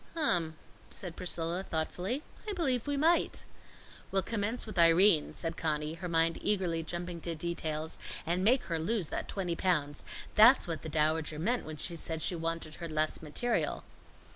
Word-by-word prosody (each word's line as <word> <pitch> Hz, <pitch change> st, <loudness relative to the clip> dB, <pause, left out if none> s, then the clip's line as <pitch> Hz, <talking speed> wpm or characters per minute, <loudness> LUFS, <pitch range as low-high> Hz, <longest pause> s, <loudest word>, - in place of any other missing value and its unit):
"Um," 175 Hz, -, +1 dB, 0.3 s
said 175 Hz, -3 st, -8 dB
Priscilla, 175 Hz, 0 st, -2 dB
thoughtfully. 185 Hz, -, -2 dB, 0.3 s
"I -, -, -1 dB
believe 270 Hz, -, 0 dB
we 285 Hz, -1 st, 0 dB
might." 330 Hz, +4 st, +2 dB, 0.7 s
"We'll 195 Hz, -1 st, +1 dB
commence 225 Hz, +3 st, -2 dB
with 215 Hz, -5 st, -4 dB
Irene," 170 Hz, 0 st, +5 dB
said 165 Hz, -1 st, -3 dB
Conny, 155 Hz, -1 st, -1 dB
her 175 Hz, +2 st, -6 dB
mind 165 Hz, 0 st, +2 dB
eagerly 185 Hz, -5 st, +2 dB
jumping 175 Hz, +1 st, -5 dB
to 170 Hz, 0 st, -2 dB
details, 160 Hz, -1 st, -3 dB, 0.3 s
"and 175 Hz, +3 st, +1 dB
make 245 Hz, +6 st, +4 dB
her 165 Hz, -2 st, -2 dB
lose 190 Hz, 0 st, -1 dB
that -, -, -3 dB
twenty 180 Hz, -4 st, -2 dB
pounds. 150 Hz, -6 st, 0 dB, 0.3 s
That's 235 Hz, +3 st, +7 dB
what 165 Hz, -2 st, -3 dB
the 160 Hz, -, -6 dB
Dowager 155 Hz, 0 st, +1 dB
meant 225 Hz, +5 st, 0 dB
when 155 Hz, -1 st, -6 dB
she 170 Hz, +3 st, -1 dB
said 160 Hz, 0 st, -4 dB
she 180 Hz, +3 st, -1 dB
wanted 165 Hz, -1 st, -3 dB
her 170 Hz, -1 st, -5 dB
less 155 Hz, 0 st, 0 dB
material." 220 Hz, +10 st, -1 dB
170 Hz, 165 wpm, -31 LUFS, 160-205 Hz, 0.7 s, That's